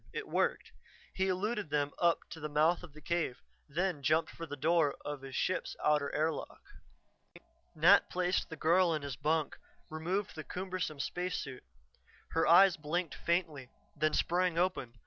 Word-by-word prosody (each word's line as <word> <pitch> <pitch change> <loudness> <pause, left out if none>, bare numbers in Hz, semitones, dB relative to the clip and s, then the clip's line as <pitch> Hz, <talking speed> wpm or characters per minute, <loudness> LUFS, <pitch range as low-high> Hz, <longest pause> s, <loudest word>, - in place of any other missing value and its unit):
It - - -5
worked. - - 0 0.4
He 190 0 0
eluded 200 0 -1
them 145 -1 0
up 170 -1 +3
to 165 - -7
the 150 -1 -4
mouth 155 +4 +3
of 175 -5 -12
the 155 - -13
cave, 165 -6 -2 0.3
then 175 +1 -1
jumped 155 +4 +2
for 165 - -8
the 145 - -5
door 155 0 +2
of 145 -2 -4
his 135 -1 -8
ship's 185 - -1
outer 150 -2 +2
airlock. 155 +1 -2 1.2
Nat 170 +6 +6
placed 180 0 0
the 160 - -6
girl 170 +2 +3
in 150 - -4
his 140 -3 -4
bunk, 155 +4 -1 0.3
removed 180 +6 -2
the 155 - -7
cumbersome 180 -5 -4
spacesuit. 170 -5 -4 0.7
Her 165 - +1
eyes 185 +3 +7
blinked 160 +2 -2
faintly, 160 -7 -1 0.3
then 155 0 +1
sprang 175 0 +1
open. 175 -9 0
160 Hz, 160 wpm, -32 LUFS, 150-180 Hz, 1.2 s, eyes